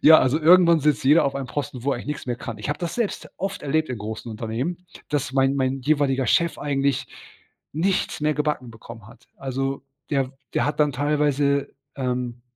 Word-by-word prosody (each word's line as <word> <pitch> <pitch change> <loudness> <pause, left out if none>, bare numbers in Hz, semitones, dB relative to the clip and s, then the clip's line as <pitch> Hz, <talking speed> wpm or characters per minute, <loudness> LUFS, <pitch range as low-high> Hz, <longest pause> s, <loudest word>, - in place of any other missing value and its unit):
Ja, 155 +1 +9
also, 135 +5 +2
irgendwann 170 0 +6
sitzt 145 -5 +1
jeder 150 +5 +6
auf 140 -1 0
einem 135 -1 -3
Posten, 125 -2 -4
wo 140 - 0
er - - -1
eigentlich - - -8
nix 150 -2 -4
mehr 120 - -2
kann. 115 -2 -7
Ich 105 - -5
habe 145 - -1
das 170 -1 -3
selbst 235 -4 -2
oft 195 0 -4
erlebt 155 +2 0
in 125 -3 -4
großen 110 +2 -6
Unternehmen, 120 +12 -4 0.2
dass 145 -1 -1
mein 135 0 +3
mein 130 0 0
jeweiliger 135 -2 +1
Chef 170 -1 +2
eigentlich 140 -2 0 0.7
nichts 180 +1 0
mehr 150 0 +1
gebacken 150 -5 -1
bekommen 115 -1 -12
hat. 120 +1 -17
Also, 135 0 -3 0.3
der 135 -2 0 0.2
der - - +2
hat 145 +1 -1
dann 150 -2 +3
teilweise, 145 0 +1 0.3
ähm, 125 -2 -3
140 Hz, 195 wpm, -24 LUFS, 125-150 Hz, 0.7 s, Ja